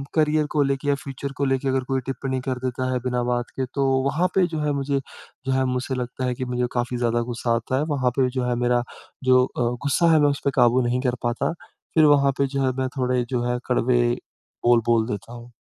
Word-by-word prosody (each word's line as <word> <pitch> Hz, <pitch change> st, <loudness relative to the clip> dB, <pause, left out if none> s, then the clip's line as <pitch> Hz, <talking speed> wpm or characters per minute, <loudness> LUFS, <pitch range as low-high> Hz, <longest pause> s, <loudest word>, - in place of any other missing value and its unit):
Career 155 Hz, -1 st, +3 dB
को 150 Hz, -, +2 dB
लेके 140 Hz, +1 st, -1 dB
या 140 Hz, -, +3 dB
फ्यूचर 140 Hz, 0 st, -6 dB
को 140 Hz, -, +1 dB
लेके 135 Hz, 0 st, 0 dB
अगर 130 Hz, -1 st, +1 dB
कोई 135 Hz, 0 st, 0 dB
टिप्पणी 135 Hz, 0 st, -3 dB
कर 130 Hz, -1 st, -1 dB
देता 130 Hz, +1 st, -2 dB
है 125 Hz, -, 0 dB
बिना 125 Hz, -1 st, 0 dB
बात 120 Hz, +1 st, -1 dB
के 130 Hz, -, 0 dB
तो, 140 Hz, -, +1 dB, 0.2 s
वहाँ 155 Hz, +7 st, +1 dB
पे 190 Hz, -2 st, +5 dB
जो 160 Hz, -2 st, -4 dB
है 150 Hz, -1 st, 0 dB
मुझे 140 Hz, 0 st, 0 dB, 0.5 s
जो 135 Hz, -, 0 dB
है 130 Hz, -, +2 dB
मुझसे 130 Hz, +1 st, -2 dB
लगता 125 Hz, +1 st, -4 dB
है 125 Hz, -, 0 dB
कि, 130 Hz, -, -4 dB
मुझे 125 Hz, 0 st, -1 dB
काफ़ी 120 Hz, 0 st, -1 dB
ज़्यादा 120 Hz, -1 st, +1 dB
ग़ुस्सा 120 Hz, 0 st, -1 dB
आता 120 Hz, +3 st, -1 dB
है। 145 Hz, -, +1 dB
वहाँ 125 Hz, -2 st, +1 dB
पे 130 Hz, -1 st, +3 dB
जो 130 Hz, -1 st, -2 dB
है 120 Hz, -, +1 dB
मेरा 120 Hz, 0 st, +2 dB, 0.4 s
जो 130 Hz, 0 st, +6 dB
अ, 125 Hz, -, -6 dB, 0.2 s
ग़ुस्सा 165 Hz, +4 st, +3 dB
है 155 Hz, -, +5 dB
मैं 145 Hz, -, +5 dB
उसपे 140 Hz, 0 st, -1 dB
काबू 120 Hz, +1 st, +4 dB
नहीं 125 Hz, +1 st, 0 dB
कर 125 Hz, -, +1 dB
पाता, 120 Hz, +5 st, 0 dB, 0.4 s
फिर 160 Hz, -, +6 dB
वहाँ 140 Hz, -2 st, +5 dB
पे 140 Hz, -, +3 dB
जो 140 Hz, 0 st, 0 dB
है 130 Hz, -, +2 dB
मैं 130 Hz, -, 0 dB
थोड़े 125 Hz, -1 st, +1 dB
जो 125 Hz, -2 st, -1 dB
है 125 Hz, -, -1 dB
कड़वे 125 Hz, 0 st, +2 dB, 0.6 s
बोल, 120 Hz, -1 st, +5 dB
बोल 115 Hz, -1 st, +3 dB
देता 110 Hz, +1 st, -5 dB
हूँ। 120 Hz, 0 st, -11 dB
130 Hz, 240 wpm, -23 LUFS, 125-140 Hz, 0.6 s, जो